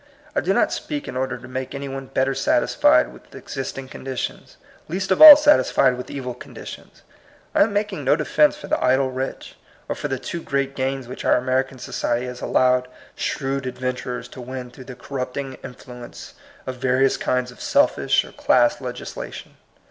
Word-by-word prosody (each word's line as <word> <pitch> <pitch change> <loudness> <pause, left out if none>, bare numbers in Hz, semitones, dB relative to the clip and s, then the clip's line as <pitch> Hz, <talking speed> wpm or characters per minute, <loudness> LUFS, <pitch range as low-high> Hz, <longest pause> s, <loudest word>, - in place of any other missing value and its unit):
I - - +2
do - - 0
not - - +2
speak 295 -2 -5
in - - -6
order 130 0 -2
to 125 +1 -12
make 130 +2 -5
any 140 0 -5
one 135 0 -6
better 135 +1 0
satisfied - - +3
with - - -17
exist 135 0 -6
ing 135 -1 -6
conditions, 130 -1 -6 0.3
least 190 +4 -3
of 190 - +2
all 310 -1 +14
satisfied 295 - +4
with 125 - -8
evil 130 -3 -5
conditions. 125 - -11 0.5
I - - +3
am 205 0 +3
making 205 -7 -2
no 135 +2 +4
defence 150 -1 +2
for - - -10
the - - -1
idle 130 +1 +2
rich, 130 +1 -5 0.3
or - - -1
for - - -4
the 135 - -2
too 170 +6 -6
great 140 -1 -2
gains 135 -1 -2
which 125 - -8
our - - +4
American 130 +1 -1
society 120 0 -2
has 125 0 -7
allowed 125 0 +2 0.3
shrewd 135 -1 -2
adventurers 125 -1 -4
to 130 - -10
win 125 0 -7
through 130 +1 -12
the 125 - -9
corrupting 130 0 -5
influence 125 -1 -10 0.3
of 130 -1 -5
various 130 +1 +2
kinds 125 0 -1
of 125 - -15
selfish - - +2
or - - -13
class 125 +1 +2
legislation. 125 -1 -7
130 Hz, 180 wpm, -22 LUFS, 125-135 Hz, 0.5 s, all